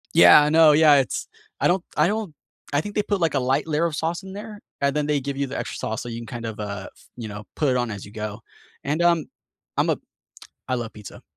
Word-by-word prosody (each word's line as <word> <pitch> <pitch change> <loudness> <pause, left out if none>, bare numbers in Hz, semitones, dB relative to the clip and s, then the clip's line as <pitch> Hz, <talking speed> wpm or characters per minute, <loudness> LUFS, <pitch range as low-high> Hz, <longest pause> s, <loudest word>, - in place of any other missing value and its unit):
Yeah, 85 +11 +9
I 150 - +2
know, 160 0 +7
yeah. 150 -1 +7
It's 135 -7 0 0.3
I - - +3
don't 180 0 +1
I - - +5
don't 210 -4 -2 0.4
I 145 - +3
think 205 +6 -5
they 210 - +2
put, 205 -2 -1
like, 165 -3 +1
a 140 - +2
light 135 +4 0
layer 155 +1 +1
of 165 -3 -1
sauce 170 +4 -2
in 190 - -9
there, 210 +1 -8 0.2
and 140 0 +1
then 150 -1 +1
they 150 -1 +1
give 140 +1 -4
you 140 +1 -1
the 135 - -5
extra - - -5
sauce 110 0 -3
so - - -8
you 115 0 -5
can - - -8
kind 120 -2 -7
of, 110 -1 -5
uh, 100 -2 -5
f - - -22
you 115 -2 -5
know, 105 0 -7
put 150 - +1
it 130 - +2
on 120 -2 0
as 100 -2 -7
you 100 - -13
go, 105 0 -5 0.5
and, 150 +4 0
um, 170 -2 +3 0.5
I'm - - +1
a - - +2 0.7
I 130 - +1
love 120 -3 -4
pizza, 105 -2 -11
145 Hz, 270 wpm, -23 LUFS, 115-165 Hz, 0.7 s, Yeah